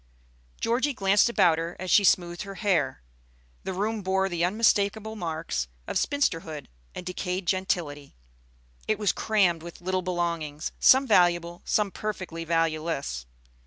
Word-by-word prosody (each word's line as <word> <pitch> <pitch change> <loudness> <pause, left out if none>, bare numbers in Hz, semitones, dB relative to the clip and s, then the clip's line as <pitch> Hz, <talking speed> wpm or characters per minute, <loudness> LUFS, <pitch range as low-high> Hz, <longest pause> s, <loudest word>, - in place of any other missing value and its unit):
Georgie 255 +4 0
glanced 200 +2 +3
about 170 -8 +3
her 165 +1 -4
as 185 0 -3
she 205 - +6
smoothed 175 -2 +2
her 195 -1 -7
hair. 175 - 0 0.6
The - - -2
room 210 +3 -2
bore 190 0 0
the 170 -2 -1
unmistakable 215 +2 +1
marks 160 - -3 0.2
of - - -5
spinsterhood 165 - -1 0.3
and 180 - -7
decayed 180 0 -3
gentility. 170 -6 -2 0.7
It 215 - +1
was 205 -4 +2
crammed 190 -7 +1
with 170 +1 -10
little 185 +1 -1
belongings, 170 -4 -3
some 265 +1 +6
valuable, 175 -5 +2
some 210 -2 +1
perfectly 185 -6 -5
valueless. 160 - -1
180 Hz, 135 wpm, -26 LUFS, 165-205 Hz, 0.7 s, she